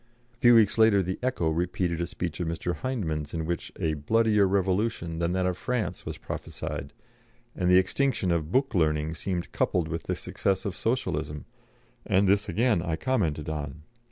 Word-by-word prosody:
A - - -32
few 120 0 +6
weeks 110 0 +4
later 110 -3 +5
the 95 +1 -3
Echo 125 -11 0
repeated 85 +1 -1
a 85 - -1
speech 85 -3 -4
of 85 - -1
Mr. 85 +2 -2
Hyndman's 85 - -3
in 80 -1 -2
which 85 0 -3
a 80 - 0
"bloodier 105 +6 +3
revolution" 95 -3 0
than 85 +1 0
that 95 0 +1
of 90 0 -1
France 125 -4 -2
was - - -4
prophesied, 70 - -6 0.6
and 90 -2 0
the 90 - +7
extinction 95 0 +1
of 80 -1 -1
"book 135 +1 +2
learning" 80 -3 +1
seemed 85 +1 -3
coupled 85 -3 0
with 80 0 -4
the - - -1
success 95 +1 -1
of 100 - -3
Socialism, 75 - -2 0.6
and 95 +1 +2
this 100 +2 +2
again 115 -6 +2
I 85 -2 -1
commented 80 - -1
on. 75 0 -5
90 Hz, 180 wpm, -27 LUFS, 80-105 Hz, 0.6 s, the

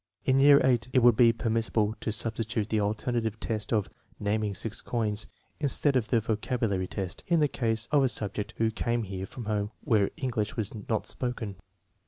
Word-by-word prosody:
In 130 0 +4
year 140 +1 +8
VIII, 130 -2 +4
it 130 -3 +4
would 120 -2 +7
be 115 0 +6
permissible 115 -2 0
to 110 - -1
substitute 110 0 -2
the 110 - +1
alternative 110 +1 -1
test 110 -2 -3
of 105 -4 +1 0.3
naming 105 0 -1
six 110 +2 -3
coins, 110 -2 -1 0.3
instead 145 -1 +1
of 120 -4 +2
the 120 - +3
vocabulary 110 -3 -1
test, 95 -3 -5
in 170 -1 +3
the 150 - +4
case 115 -4 -1
of 145 -2 +4
a 130 - +3
sub 105 -2 -2
ject 105 - -5
who 110 0 +2
came 120 +1 -1 0.2
from 120 +2 -8
a - - -5
home 105 -1 -1
where 105 -3 +2
English 115 -5 -2
was 110 -3 -2 0.2
not 110 -2 0
spoken. 120 -5 -3
110 Hz, 190 wpm, -28 LUFS, 105-120 Hz, 0.3 s, year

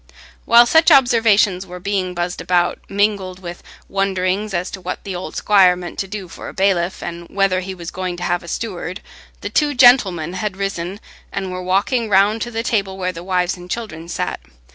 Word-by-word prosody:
While 235 +1 +7
such 320 +7 +5
observations 225 - +4
were 180 0 -8
being 185 -1 -2
buzzed 175 +1 -3
about, 175 -1 +1
mingled 200 -2 0
with 175 -2 -8 0.3
wonderings 195 +1 -1
as 180 0 -2
to 190 - -8
what 180 0 -5
the 195 -3 -5
old 180 - -6
squire 190 -3 +5
meant 180 -1 -8
to 195 - -2
do 195 -1 -6
for - - -9
a - - -12
bailiff, 190 -2 +1
and 170 0 -6
whether 195 -2 +1
he 190 +1 -6
was 170 -2 -7
going 185 -1 -4
to 175 - -6
have 175 0 0
a 170 - -13
steward, 185 -2 -5 0.4
the - - -4
two 295 -2 +1
gentlemen 200 -10 +5
had 190 +1 -3
risen, 195 -1 -3 0.3
and 190 -1 -4
were 185 0 -5
walking 205 +6 0
round 205 +3 +3
to 240 - -2
the 225 -1 -3
table 195 -5 -1
where 185 -1 -1
the 170 -1 -9
wives 180 -1 0
and 180 0 -12
children 175 -7 -5
sat. - - -3
190 Hz, 200 wpm, -19 LUFS, 180-205 Hz, 0.4 s, While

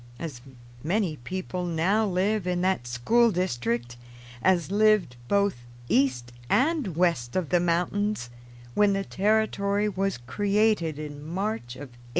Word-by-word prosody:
As 145 -6 -6 0.4
many 175 -1 0
people 180 +7 -4
now 180 +6 +1
live 195 +1 0
in 180 -1 0
that 185 -10 0
school 225 - +3
district 120 - -2 0.4
as 180 +1 +2
lived 210 - +3
both 200 -1 +2 0.3
east 125 -3 +1 0.2
and 275 - +1
west 165 -10 +1
of 185 -5 -1
the 175 - +3
mountains 175 - 0 0.4
when 205 +4 +4
the 195 0 -1
Territory 205 0 +1
was 195 -3 -1
created 200 - +1
in 145 -1 -7
March 175 - -3
of 145 +1 -9
1853. - - -20
180 Hz, 135 wpm, -26 LUFS, 145-205 Hz, 0.4 s, when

